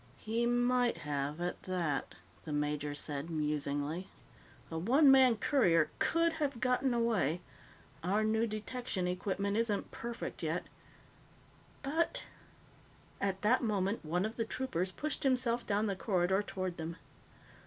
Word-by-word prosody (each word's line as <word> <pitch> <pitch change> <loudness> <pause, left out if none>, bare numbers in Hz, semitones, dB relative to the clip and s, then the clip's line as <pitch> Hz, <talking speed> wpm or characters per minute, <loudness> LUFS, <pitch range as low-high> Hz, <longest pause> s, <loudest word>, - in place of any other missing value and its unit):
"He 230 +2 0
might 245 0 +2
have, 145 +1 -2
at 175 0 -3
that," 170 -7 -2 0.3
the 155 - -6
major 150 0 -1
said 145 +1 -4
musingly. 150 +2 -2 0.6
"A 160 - -3
one 270 - +6
man 260 -4 +6
courier 180 - +3
could 335 0 +2
have 280 -5 0
gotten 250 +3 +2
away. 225 - +1 0.6
Our 200 +5 +2
new 220 +1 +2
detection 215 -3 -3
equipment 200 +3 -1
isn't 225 -3 0
perfect 235 0 -5
yet. - - -1 1.2
But 330 - 0 0.5
" - - -27 0.3
At 195 0 -1
that 235 +5 +4
moment, 205 -3 0
one 175 +5 0
of 220 +1 -5
the 230 - +1
troopers 190 -8 -2
pushed 305 +9 -3
himself 250 -3 +1
down 205 +1 +2
the 200 -2 0
corridor 190 -1 +1
toward 185 -3 -4
them. 165 +1 -4
200 Hz, 135 wpm, -33 LUFS, 170-240 Hz, 1.2 s, one